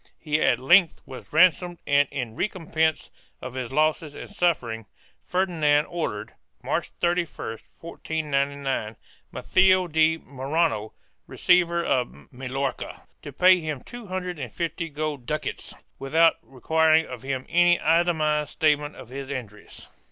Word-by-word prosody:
He 150 -1 -1
at 120 - +3
length 165 +7 +4
was 130 -1 -11
ran 175 +4 +7
somed 175 +1 -9
and, 145 0 +3
in 120 -5 -5
recompense 160 - -1 0.3
of 125 - -8
his 130 -2 -5
losses 155 +1 0
and - - -8
sufferings, 125 - -1 0.4
Ferdinand 160 -6 +2
ordered, 110 -11 -4 0.3
March - - -2
31, 170 -10 -1 0.2
1499, 140 -7 -2 0.4
Matheo 185 -1 +3
de 160 0 +3
Morrano 135 -6 -2 0.3
receiver 170 -1 +2
of 125 +1 -2
Mallorca 135 +2 -4 0.2
to - - -8
pay 185 0 +5
him 155 -5 -4
two 240 -3 -10
hundred 180 -2 -4
and 125 -5 -6
fifty 165 0 -3
gold 150 -4 -4
ducats 150 0 -4 0.2
without 160 +5 +3
requiring 160 +4 +2
of 125 -2 -8
him 130 -1 -4
any 175 0 +4
itemized 155 -2 +2
statement 150 -2 +1
of 120 - -12
his 135 +1 -7
injuries. 110 -7 -8
155 Hz, 130 wpm, -25 LUFS, 135-170 Hz, 0.4 s, ran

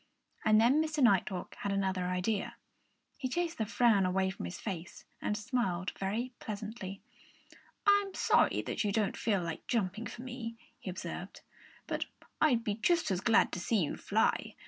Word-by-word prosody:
And 215 0 +5
then 255 +7 +5
Mr. 310 -3 0
Nighthawk 195 -4 +2
had 200 - -2
another 190 -2 0
idea. 180 +3 -1 0.6
He 260 -3 -2
chased 340 +1 -1
the 220 - 0
frown 225 -3 +4
away 190 +1 +1
from 190 - -6
his 85 - -6
face 185 -4 -6 0.2
and 210 - 0
smiled 205 -5 -1
very 225 +6 -2
pleasantly. 210 -2 -6 0.9
"I'm 405 -1 +4
sorry - - +3
that - - -2
you 205 - +1
don't 210 -1 +1
feel 200 -5 +1
like 165 -1 -5
jumping 215 -1 -1
for 240 - -8
me," 240 -3 -6 0.2
he - - -6
observed. 180 +1 -6 0.4
"But - - -2 0.4
I'd 250 -7 +4
be 210 - 0
just 335 - +2
as 180 -1 0
glad 225 +2 +4
to - - -3
see 200 +2 +2
you 150 - -2
fly! - - +1
210 Hz, 170 wpm, -32 LUFS, 190-240 Hz, 0.9 s, And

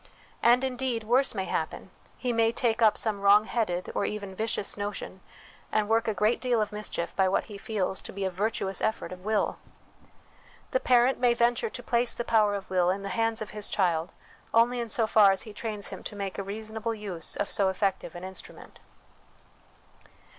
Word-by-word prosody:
And, 245 +2 +5
indeed, 250 -3 -1
worse 245 +3 +3
may 190 -2 -1
happen: - - -3 0.3
he 250 -1 -1
may 225 0 +3
take 235 -1 0
up 215 -2 +5
some 210 -3 -1
wrong 205 +2 +6
headed, 185 -7 -2
or - - 0
even 205 -2 -4
vicious, 215 0 -2
notion 205 -2 -5 0.5
and 215 -1 +1
work 225 +1 +2
a 220 - +1
great 215 +5 +2
deal 245 -3 +1
of 215 - -1
mischief 210 -5 -3
by 190 -1 +3
what 190 - +1
he 205 - -9
feels 195 -3 -2
to - - -6
be 195 0 -3
a 190 - -1
virtuous 195 0 -1
effort 220 -5 -1
of 180 0 -9
will. 215 0 0 1.1
The - - +2
parent 250 - +3
may 245 -1 +4
venture 235 -1 +2
to 245 - -7
place 235 0 +1
the 240 - -2
power 215 -3 +3
of 200 - -6
will 180 -1 +2
in 195 +2 -1
the 200 - -4
hands 225 +2 0
of 210 - -10
his 210 -1 -3
child 175 -3 0 0.4
only 240 +2 +4
in 235 -1 -3
so 225 +1 +2
far 210 -2 +6
as 195 - -1
he 215 - -10
trains 210 -2 -3
him - - -8
to - - -6
make 200 -1 -4
a - - -2
reasonable 220 +3 -4
use 195 -6 -2
of 205 - -2
so 195 -2 +3
effective 190 -3 -1
an 175 - -8
instrument. 190 0 -9
215 Hz, 200 wpm, -28 LUFS, 195-230 Hz, 1.1 s, wrong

